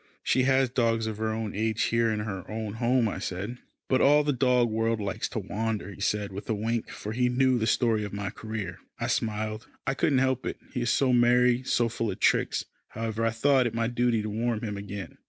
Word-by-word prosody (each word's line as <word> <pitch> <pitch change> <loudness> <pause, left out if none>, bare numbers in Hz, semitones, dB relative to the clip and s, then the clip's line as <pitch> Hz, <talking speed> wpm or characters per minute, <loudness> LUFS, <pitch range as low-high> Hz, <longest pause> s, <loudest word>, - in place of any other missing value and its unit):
"She 130 - +2
has 135 0 +4
dogs 115 -3 +1
of 110 -2 -3
her 110 0 0
own 110 -2 -3
age 110 +1 0
here 115 0 +2
in 105 -1 -1
her 100 -4 -4
own 110 -1 -4
home," 120 0 +3
I 105 - -3
said. 100 +7 -4 0.3
"But 130 - +2
all 150 +2 +6
the 145 0 +1
dog 125 -1 +3
world 115 0 0
likes 105 +1 -3
to - - -5
wander," 105 0 -3
he 100 - -12
said 105 0 0
with 100 +2 -8
a 110 - +1
wink, 115 +2 -2
for 105 - -6
he 125 +2 +1
knew 130 0 +3
the 110 - 0
story 115 -2 +2
of 105 - -5
my 100 -1 -4
career. 110 -6 -5 0.2
I - - -1
smiled. 110 0 -2 0.2
I 135 - +1
couldn't 145 -1 +2
help 130 -1 +1
it. - - -3 0.2
He 125 - -2
is 120 - 0
so 130 0 +3
merry, 125 0 +4
so 120 -2 +1
full 115 -1 -2
of 95 - -5
tricks. - - +2 0.2
However, 115 0 -3
I 115 - +3
thought 125 +3 +3
it 115 - -5
my 115 0 +1
duty 120 -2 +1
to 110 - -3
warn 115 +1 -1
him 105 -2 -3
again. 100 -3 -7
115 Hz, 230 wpm, -27 LUFS, 105-125 Hz, 0.3 s, all